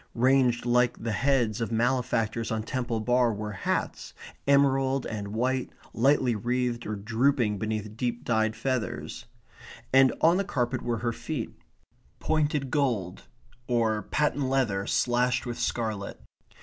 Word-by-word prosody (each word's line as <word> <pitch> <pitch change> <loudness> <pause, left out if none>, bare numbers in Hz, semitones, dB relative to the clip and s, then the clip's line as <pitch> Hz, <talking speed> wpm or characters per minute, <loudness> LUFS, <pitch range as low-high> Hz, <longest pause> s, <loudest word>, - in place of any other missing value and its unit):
Ranged 125 -1 +3
like 120 -1 +2
the 115 - -1
heads 120 0 +1
of 115 - -2
malefactors 115 -1 0
on 110 -1 -2
Temple 120 -1 -2
Bar 125 +1 +2
were 105 0 -4
hats 95 - -3 0.3
emerald 135 -1 +3
and 105 -2 -4
white, 125 +5 -1 0.2
lightly 130 0 +3
wreathed 120 +2 -1
or 105 - -2
drooping 115 0 +1
beneath 110 0 -3
deep 120 0 -2
dyed 110 -1 +1
feathers. 125 0 -3 0.7
And 135 -1 +6
on 165 +3 +4
the 200 - +1
carpet 130 -9 -1
were 120 -1 -1
her 115 - +1
feet 140 -1 -5 0.7
pointed 150 -4 0
gold, 115 -11 -1 0.4
or 115 -3 +1
patent 145 0 0
leather 110 -8 0
slashed 125 0 +1
with 120 -1 -5
scarlet. 110 -4 -2
120 Hz, 135 wpm, -27 LUFS, 110-130 Hz, 0.7 s, And